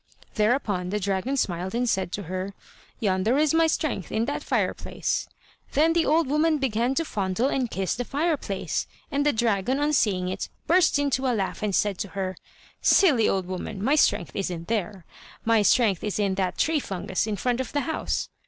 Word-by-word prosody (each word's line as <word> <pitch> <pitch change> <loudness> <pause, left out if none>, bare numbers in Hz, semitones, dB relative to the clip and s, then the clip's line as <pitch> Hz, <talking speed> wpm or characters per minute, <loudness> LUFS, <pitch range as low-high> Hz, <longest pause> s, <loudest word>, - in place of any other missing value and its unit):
Thereupon 210 -5 +1
the 210 +2 -1
dragon 200 +7 -1
smiled 185 -2 -1
and 245 +1 0
said 190 -5 0
to 205 - -3
her: 185 +3 -5 0.4
"Yonder 205 +4 +1
is 305 0 +3
my 325 0 +4
strength, 310 - -2
in 220 +1 0
that 285 - -3
fireplace." - - -1 0.5
Then 315 +3 +4
the 335 -1 +2
old 320 +2 +3
woman 305 +3 +2
began 250 -1 0
to 330 - 0
fondle 200 +2 -1
and 260 -4 -1
kiss 190 -3 -1
the 245 - -3
fireplace, 285 - -2 0.2
and 285 0 +1
the 295 - +3
dragon 230 +2 +1
on 295 +1 +1
seeing 190 -9 +2
it 185 - -4 0.2
burst 345 -2 +4
into 275 -2 0
a 245 - +2
laugh 195 -2 -2
and 205 -3 0
said 205 -3 +1
to - - -2
her: 190 -1 -2 0.5
"Silly 275 - +5
old 190 -2 0
woman, 185 +2 -5
my 270 +6 +3
strength 280 - +2
isn't 175 -3 -3
there; 205 -4 -2 0.4
my 225 -1 +4
strength 205 -3 +3
is 210 - -2
in 200 -2 +1
that 190 -1 -1
tree 320 -1 +2
fungus 190 -2 -2
in 215 - -1
front 245 +5 -1
of 260 - -6
the 290 - 0
house." 320 +5 -2
220 Hz, 190 wpm, -25 LUFS, 190-280 Hz, 0.5 s, Silly